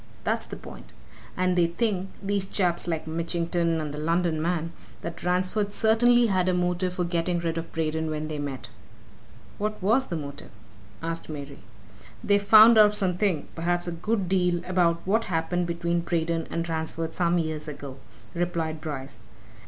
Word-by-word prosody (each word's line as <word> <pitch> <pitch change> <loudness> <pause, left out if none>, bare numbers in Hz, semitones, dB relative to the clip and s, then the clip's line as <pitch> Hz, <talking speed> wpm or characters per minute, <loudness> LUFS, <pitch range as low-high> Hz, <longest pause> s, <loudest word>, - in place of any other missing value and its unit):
that's - - -1
the - - -7
point. - - -12 0.4
And 185 0 +2
they 175 -1 +4
think 195 +1 -1
these 195 -1 0
chaps 175 -3 0
like 160 -2 -2
Mitchington 170 +1 -1
and 150 -2 -4
the 150 - -5
London 165 0 +1
man 165 0 -1 0.3
that 170 0 -6
Ransford 185 +3 0
certainly 240 +3 +4
had 185 -4 +2
a 180 - +2
motive 180 +1 0
for 180 - 0
getting 175 0 0
rid 165 -1 -2
of 165 0 -5
Braden 160 0 -1
when 155 0 -3
they 155 -1 -4
met." 140 -3 -5 0.9
"What 215 +1 -2
was 230 +8 +2
the 175 - -3
motive?" 140 -2 -7 0.5
asked 165 0 -4
Mary. 140 -2 -7 0.6
"They've 205 0 +3
found 220 +3 +8
out 210 -1 +6
something 185 -4 0
perhaps 175 +1 -1
a - - -1
good 195 +3 -1
deal 180 -2 +1
about 175 -2 +2
what 220 +4 +2
happened 175 +1 -1
between 170 0 -1
Braden 165 -1 -1
and 170 0 -2
Ransford 160 0 -3
some 175 0 +2
years 160 -2 -2
ago," 140 -3 -7 0.4
replied 165 -3 -2
Bryce. 135 -6 -6
170 Hz, 165 wpm, -26 LUFS, 160-185 Hz, 0.9 s, found